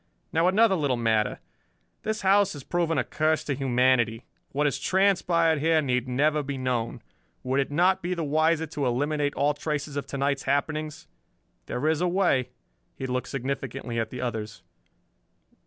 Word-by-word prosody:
"Now 165 +2 +3
another 205 +2 +4
little 145 -8 0
matter. 110 -2 0 0.6
This 220 0 -2
house 195 +1 +4
has 145 -3 -9
proven 170 -1 0
a 130 - +2
curse 155 0 0
to 145 - -2
humanity. 125 -3 +1 0.3
What 145 +2 0
has 145 - 0
transpired 175 -4 +2
here 160 +2 +3
need 125 -4 0
never 150 +4 +2
be 140 -1 -4
known. 125 -3 -2 0.4
Would 130 +2 0
it 135 - 0
not 180 +6 +2
be 180 +1 -2
the 170 - -2
wiser 155 +2 +2
to 145 -3 -3
eliminate 145 +3 0
all 145 +1 +2
traces 150 -1 -4
of 145 - -3
to 140 - -5
night's 140 0 0
happenings? 150 +2 -1 0.6
There 140 +5 -2
is 160 +1 +1
a 180 - +2
way." 175 -9 +2 0.5
He 135 - -5
looked 125 -1 -2
significantly 135 -2 -4
at 110 -1 -2
the 125 +1 -6
others. 110 -3 -4
145 Hz, 170 wpm, -26 LUFS, 130-160 Hz, 0.6 s, another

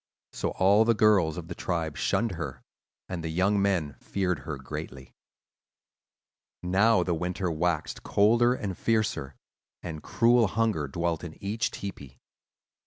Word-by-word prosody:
So - - -2
all 100 +3 +5
the 115 0 +3
girls 100 -7 +3
of 85 -2 -6
the 85 - -5
tribe 80 -4 -3
shunned 115 -1 0
her, 80 -7 -6 0.4
and 85 -3 -5
the 80 - -3
young 95 +5 +2
men 90 -8 +1
feared 90 -5 -1
her 70 +2 -6
greatly. 65 0 -8 1.5
"Now 95 +2 +3
the 85 - -1
winter 90 +2 -2
waxed 80 0 -1
colder 120 +4 +3
and 100 -6 -4
fiercer, 105 - -1 0.5
and 80 -3 -6
cruel 120 -1 +3
hunger 105 -8 0
dwelt 85 +4 -2
in 80 -3 -7
each 105 +3 -2
tepee. 70 -10 -8
90 Hz, 140 wpm, -28 LUFS, 80-105 Hz, 1.5 s, all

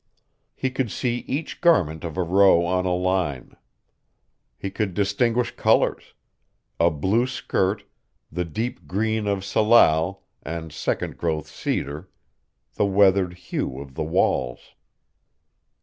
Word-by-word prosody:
He 130 - -2
could 130 -2 -1
see 120 +3 -1
each 145 +5 -4
garment 80 - +3
of 85 0 -6
a 90 - +1
row 90 -1 +5
on 90 +1 0
a 90 - +1
line. 90 -7 -1 1.0
He 95 - -5
could 100 -5 -2
distinguish 115 +5 +1
colors - - +1 0.6
a 85 +1 +5
blue 95 - +1
skirt, 100 -5 -1 0.5
the 90 - -2
deep 110 +9 -4
green 110 +2 -1
of 100 -1 -1
salal 95 -4 +3 0.2
and 80 -2 -6
second - - -3
growth 80 -3 -1
cedar, 75 +3 -4 0.6
the - - +1
weathered 95 -2 +3
hue 85 -6 -4
of 70 -1 -10
the 70 - -3
walls. 65 -5 -1
95 Hz, 125 wpm, -24 LUFS, 80-105 Hz, 1.0 s, row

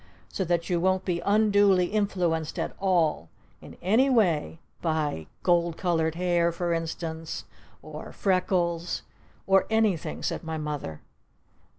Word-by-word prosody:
So 190 - -2
that 170 -1 0
you 175 -2 +1
won't 185 +1 +1
be 175 -2 0
unduly 205 -2 +4
influenced 180 -7 0
at - - -3
all 170 - +1 0.3
in - - -12
any 225 +9 +4
way 175 - +2 0.2
by 155 - -1 0.2
gold 170 -2 +2
colored 165 -3 0
hair, 175 -1 +2
for 170 0 -1
instance 165 -1 -4 0.4
or - - -8
freckles 180 -3 0 0.2
" - - -32
"Or 195 0 +4
anything!" 220 -7 0
said - - -2
my 160 -1 -4
Mother. 150 - -5
175 Hz, 130 wpm, -27 LUFS, 160-190 Hz, 0.4 s, unduly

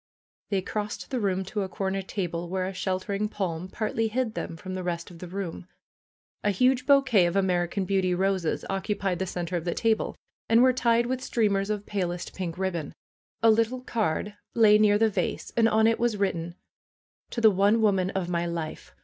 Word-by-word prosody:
They 195 -3 0
crossed 210 +2 -4
the 255 - 0
room 190 -3 0
to 205 +2 -3
a 190 - -3
corner 195 +1 -2
table 175 -3 -4
where 185 0 -1
a 190 - -4
sheltering 195 +3 -2
palm 180 -4 -3
partly 225 +3 -1
hid 235 0 -1
them 165 - -5
from 185 +3 -7
the 185 - -3
rest 175 -1 -4
of 170 - -13
the 180 - -7
room. 180 -1 -5 0.8
A 205 - +2
huge 255 +6 +2
bouquet 265 -10 +5
of 170 - -3
American 185 0 +1
Beauty 185 -1 +1
roses 190 -3 0
oc 195 0 -3
cupied 200 -4 -1
the 190 - -1
center 175 0 -3
of 165 - -4
the 175 0 -2
table, 225 -1 +1 0.3
and 230 +2 +6
were 255 0 +5
tied 235 -1 +2
with 255 +1 -2
streamers 205 -5 +1
of 210 -1 -2
palest 180 -3 -3
pink 175 -3 -4
ribbon. 180 -5 -3 0.5
A 225 - +7
little 230 +3 +1
card 210 -4 -1 0.2
lay 215 -2 +6
near 205 -1 +5
the 225 +1 +4
vase, - - -2
and 230 -1 +4
on 220 0 +3
it 225 0 +3
was 235 -3 +1
written 175 -4 -1 0.7
''To - - -4
the 220 - +8
one 200 +4 +3
woman 195 -4 +2
of 190 -3 -2
my 175 -1 -1
life 165 -2 -5
195 Hz, 200 wpm, -27 LUFS, 180-220 Hz, 0.8 s, the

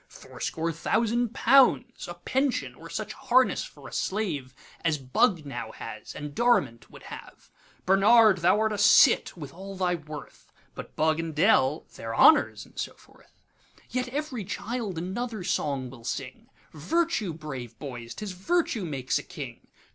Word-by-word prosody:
Fourscore 165 +1 -4
thousand 230 +8 0
pounds;A 250 -9 +3
pension, 265 +9 -1
or - - -12
such - - -4
harness 255 +1 +2
for - - -12
a - - -11
slaveAs 150 -6 -3
Bug 180 -11 +3
now 120 -5 -6
has, 110 -1 -8
and 145 0 -6
Dorimant 240 - +1
would - - -14
have. - - -11 0.3
Barnard, 200 +1 +6
thou 180 +5 +4
art 220 -1 +1
a 205 - -3
cit, 210 0 +5
with 145 -4 -8
all 195 +3 -8
thy 180 -1 0
worth; 155 -3 -9 0.2
But - - -9
Bug 155 +1 +2
and 165 -2 -4
D—l 155 -5 +3
their 115 0 -5
Honours! 305 - +5
and - - -12
so - - -4
forth. - - -23 0.5
Yet 250 0 -1
ev'ry 275 -4 -3
child 205 0 -4
another 205 +5 -4
song 140 -8 -1
will 120 -3 -13
sing,'Virtue, 165 - -3
brave 135 -7 -7
boys! 120 -5 -7
't 210 - -6
is 200 - -4
Virtue 225 - 0
makes 135 -5 -1
a - - -8
King. 140 -9 -9
175 Hz, 150 wpm, -27 LUFS, 145-225 Hz, 0.5 s, Barnard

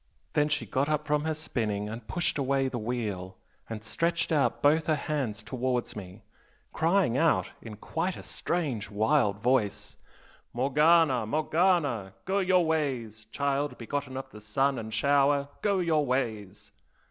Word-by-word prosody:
Then 150 0 +2
she 150 0 0
got 140 +3 0
up 150 0 0
from 150 0 0
her 160 - 0
spinning 110 -9 -2
and 110 +1 -7
pushed 175 -4 0
away 135 0 +1
the 125 -2 -3
wheel, 105 -6 -4 0.3
and 110 -1 -6
stretched 165 +11 -1
out 150 -4 +1
both 155 +2 +4
her 155 - +3
hands 135 -8 -3
towards 125 0 -2
me, 100 +1 -9 0.5
crying 165 -6 +2
out 165 0 +2
in 110 -2 -8
quite 165 - -3
a - - -9
strange, 135 - -2
wild 105 0 +2
voice 120 -5 0 0.6
'Morgana! 140 -1 +3
Morgana! 150 - +1
Go 195 +2 +1
your 185 -2 +3
ways, 130 -9 -2
child 140 +5 -1
begotten 130 +2 -4
of 135 - -5
the 105 - -11
sun 135 +6 0
and 110 0 -6
shower! 140 +3 +2
go 200 -2 +2
your 165 -4 +2
ways! 110 -6 -3
135 Hz, 150 wpm, -28 LUFS, 110-155 Hz, 0.6 s, both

